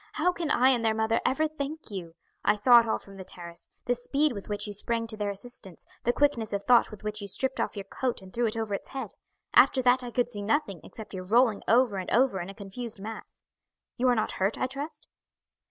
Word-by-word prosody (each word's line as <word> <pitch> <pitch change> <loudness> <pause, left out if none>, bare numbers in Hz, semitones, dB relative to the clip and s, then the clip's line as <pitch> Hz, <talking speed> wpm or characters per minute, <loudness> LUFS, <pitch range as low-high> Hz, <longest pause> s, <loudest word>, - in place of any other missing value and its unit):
How 350 +4 +2
can 345 -3 -3
I 255 -2 +5
and 245 -3 +2
their 220 -1 +2
mother 220 +1 +1
ever 310 +4 +2
thank 305 -2 -6
you? 170 -4 -6 0.3
I 210 - +4
saw 240 +3 +7
it 230 - 0
all - - +1
from 195 -1 -14
the 190 - -7
terrace 170 -2 -8 0.2
the 245 - +2
speed 280 +5 +1
with 200 -1 -8
which 205 0 -1
you 205 - -5
sprang 230 +3 -1
to 225 -1 -3
their 210 -1 -2
assistance 200 -3 -7 0.2
the 240 - +4
quickness 245 -6 +1
of 200 0 -1
thought 245 -2 +5
with 215 -2 -11
which 210 0 -3
you 200 - -5
stripped 265 +7 -1
off - - -1
your 200 - -3
coat 245 +5 -2
and 190 -1 -14
threw 240 0 +1
it 220 - -3
over 220 -2 -2
its 200 - -4
head. 265 -6 -5 0.4
After 260 - +6
that 250 +1 +4
I 245 - -5
could 240 +1 +1
see 210 -4 -3
nothing 205 - 0
except 220 -2 -10
your 185 -1 -6
rolling 230 0 +4
over 230 -3 +4
and 185 - -4
over 245 -5 +3
in 175 +1 -5
a 195 - -9
confused 210 +2 -6
mass. 220 +3 -9 0.5
You 255 - +1
are 245 - +4
not 215 - 0
hurt, 195 +3 0
I - - 0
trust?" 275 +4 -5
225 Hz, 245 wpm, -28 LUFS, 200-255 Hz, 0.5 s, saw